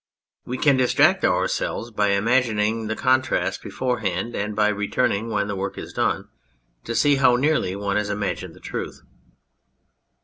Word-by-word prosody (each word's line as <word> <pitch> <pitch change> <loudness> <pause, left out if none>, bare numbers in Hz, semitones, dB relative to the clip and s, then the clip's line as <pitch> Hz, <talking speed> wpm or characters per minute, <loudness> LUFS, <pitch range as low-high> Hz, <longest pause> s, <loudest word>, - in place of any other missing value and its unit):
We 125 - -4
can 140 0 +3
distract 130 -1 +3
ourselves 120 - 0
by 105 -1 +1
imagining 110 0 +1
the 110 - -2
contrast 130 +1 +1
beforehand 120 -4 -2
and 105 +1 -3
by 105 0 +3
return 105 +4 0
ing, 110 +4 -3
when 105 -2 -1
the 105 - -3
work 95 0 -4
is - - -8
done, - - -1 0.6
to 115 - -3
see 145 +1 +4
how 130 -2 +5
nearly 135 -8 +1
one 100 0 -1
has 105 -1 -1
imagined 105 -1 -3
the - - -15
truth. - - -6
110 Hz, 160 wpm, -23 LUFS, 105-125 Hz, 0.6 s, how